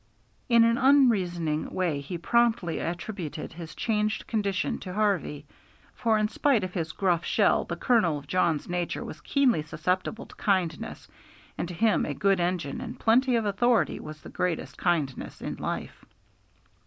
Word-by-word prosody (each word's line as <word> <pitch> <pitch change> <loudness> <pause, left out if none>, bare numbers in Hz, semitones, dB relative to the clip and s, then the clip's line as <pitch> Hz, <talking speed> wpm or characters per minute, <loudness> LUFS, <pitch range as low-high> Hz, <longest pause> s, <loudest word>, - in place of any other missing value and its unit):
In 235 -1 +6
an 230 +1 +3
unreasoning 185 - +3
way 170 -6 0
he 155 +5 -5
promptly 225 -3 +1
attributed 170 -3 -5
his 165 -1 -9
changed 215 -1 -1
condition 200 -4 -1
to 185 -1 -7
Harvey; 190 -9 0 0.5
for 225 -3 +1
in 215 0 +2
spite 235 0 +2
of 185 -1 -4
his 165 -4 -2
gruff 175 -3 +1
shell - - +2
the - - -4
kernel 215 - +2
of 145 - -10
Jawn's 170 -2 +1
nature 175 -1 -2
was - - -9
keenly 265 - +2
susceptible 180 +8 -2
to - - -15
kindness, 185 -6 -1 0.5
and - - -3
to 175 - -7
him 220 +5 +2
a - - -3
good 195 -1 +2
engine 175 -5 -1
and 245 0 -7
plenty 250 +3 +3
of 225 -2 +1
authority 225 +3 +2
was 155 0 -9
the - - -9
greatest 180 -3 -2
kindness 155 -7 -1
in - - -5
life. - - -5
185 Hz, 160 wpm, -27 LUFS, 170-225 Hz, 0.5 s, In